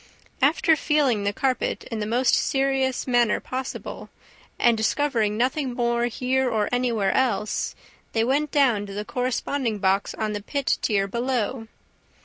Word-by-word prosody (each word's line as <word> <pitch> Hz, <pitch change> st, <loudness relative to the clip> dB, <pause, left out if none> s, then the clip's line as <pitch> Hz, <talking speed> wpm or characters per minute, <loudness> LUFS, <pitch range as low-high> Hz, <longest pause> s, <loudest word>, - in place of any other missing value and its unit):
After, 315 Hz, +3 st, +4 dB
feeling 280 Hz, -9 st, +1 dB
the 200 Hz, -, +2 dB
carpet 260 Hz, +4 st, -1 dB
in 225 Hz, -, -3 dB
the 210 Hz, -, -2 dB
most 245 Hz, +3 st, +2 dB
serious 270 Hz, -1 st, +1 dB
manner 240 Hz, -3 st, +2 dB
possible, 260 Hz, +1 st, -6 dB, 0.5 s
and 235 Hz, -1 st, +4 dB
discovering 220 Hz, -2 st, 0 dB
nothing 255 Hz, +1 st, 0 dB
more 235 Hz, -1 st, +1 dB
here 255 Hz, +2 st, 0 dB
or 215 Hz, -3 st, 0 dB
anywhere 235 Hz, -6 st, +1 dB
else, 215 Hz, -5 st, 0 dB, 0.4 s
they 225 Hz, -, +2 dB
went 285 Hz, +5 st, +1 dB
down 245 Hz, -9 st, +2 dB
to 200 Hz, -, -8 dB
the 210 Hz, +1 st, -4 dB
corresponding 250 Hz, -1 st, -1 dB
box 195 Hz, 0 st, 0 dB
on 215 Hz, -1 st, -2 dB
the 205 Hz, -, -4 dB
pit 280 Hz, +5 st, -1 dB
tier 200 Hz, -3 st, +1 dB
below. 235 Hz, +1 st, -2 dB
240 Hz, 145 wpm, -24 LUFS, 215-265 Hz, 0.5 s, After